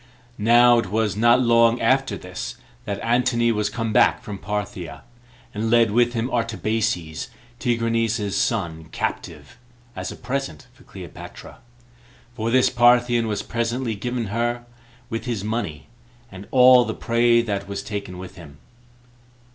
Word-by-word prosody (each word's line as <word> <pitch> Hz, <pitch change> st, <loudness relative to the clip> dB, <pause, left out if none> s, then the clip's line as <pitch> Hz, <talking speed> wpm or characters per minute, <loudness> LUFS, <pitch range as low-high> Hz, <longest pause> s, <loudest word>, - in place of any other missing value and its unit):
Now 120 Hz, +2 st, +5 dB
it 105 Hz, -, -3 dB
was 105 Hz, 0 st, 0 dB
not 120 Hz, +3 st, +4 dB
long 115 Hz, 0 st, +4 dB
after 130 Hz, -2 st, +1 dB
this 90 Hz, +7 st, -7 dB, 0.3 s
that 100 Hz, -1 st, -4 dB
Antony 120 Hz, 0 st, +2 dB
was 105 Hz, -2 st, -1 dB
come 115 Hz, -2 st, -3 dB
back -, -, +4 dB
from 100 Hz, -2 st, -7 dB
Parthia, 100 Hz, -8 st, -5 dB, 0.5 s
and 110 Hz, +2 st, -2 dB
led 115 Hz, -2 st, +4 dB
with 120 Hz, +2 st, +2 dB
him 115 Hz, 0 st, -1 dB
Artabazes, 110 Hz, -, -2 dB, 0.3 s
Tigranes's 115 Hz, -3 st, 0 dB
son, 85 Hz, -8 st, -1 dB
captive, -, -, -6 dB, 0.4 s
as -, -, -5 dB
a -, -, -8 dB
present 125 Hz, -, -5 dB
for -, -, -23 dB
Cleopatra; -, -, -11 dB, 0.7 s
for 115 Hz, -1 st, -3 dB
this 130 Hz, +1 st, +3 dB
Parthian 120 Hz, -1 st, +3 dB
was 105 Hz, -2 st, -2 dB
presently 115 Hz, +1 st, -2 dB
given 120 Hz, +1 st, -4 dB
her, 120 Hz, +1 st, -1 dB, 0.5 s
with 115 Hz, +2 st, -4 dB
his 115 Hz, -6 st, -3 dB
money, 105 Hz, -, -4 dB, 0.5 s
and 95 Hz, +1 st, -10 dB
all 125 Hz, -1 st, +7 dB
the -, -, -4 dB
prey 120 Hz, 0 st, +2 dB
that 100 Hz, -3 st, -3 dB
was 100 Hz, 0 st, -5 dB
taken 100 Hz, -4 st, -6 dB
with 95 Hz, +1 st, -10 dB
him. 75 Hz, -5 st, -13 dB
115 Hz, 140 wpm, -22 LUFS, 100-120 Hz, 0.7 s, all